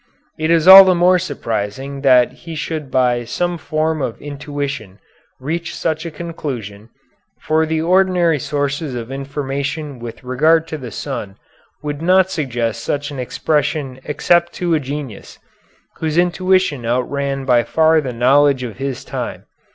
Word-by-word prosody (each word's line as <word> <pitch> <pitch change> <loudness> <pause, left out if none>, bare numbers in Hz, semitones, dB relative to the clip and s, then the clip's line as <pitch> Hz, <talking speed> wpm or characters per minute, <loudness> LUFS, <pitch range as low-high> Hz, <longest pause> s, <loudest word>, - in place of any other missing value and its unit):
It 155 +1 0
is 165 0 +3
all 190 +1 +12
the 185 -1 +3
more 180 +1 +4
surprising 135 - -4
that 125 -3 +5
he 165 -1 -10
should 155 -2 -4
by 125 -2 +1
some 175 +8 -2
form 155 0 -1
of 115 - -3
intuition 145 -7 -5 0.4
reach 165 +5 -4
such 160 +1 -2
a - - -4
conclusion, 130 - -7 0.5
for 160 +1 +1
the 160 0 -1
ordinary 180 -3 +3
sources 145 0 -2
of 120 +1 -6
information 140 +1 -4
with 115 +1 -9
regard 155 +6 +2
to 155 - -5
the 125 -3 -7
sun 115 -4 -6 0.5
would 145 0 -4
not 185 +2 +3
suggest 120 - -2
such 145 +1 -2
an 140 - -7
expression 140 0 -1
except 170 +4 +1
to 175 -2 -1
a 160 - +3
genius, 140 -5 -7 0.6
whose 160 0 -2
intuition 180 -5 +2
outran 135 +3 -2
by 125 -2 +4
far 160 +5 +3
the 130 -3 -4
knowledge 130 +3 +3
of 115 -4 -6
his 135 -2 -4
time. - - -5
145 Hz, 150 wpm, -18 LUFS, 130-160 Hz, 0.6 s, all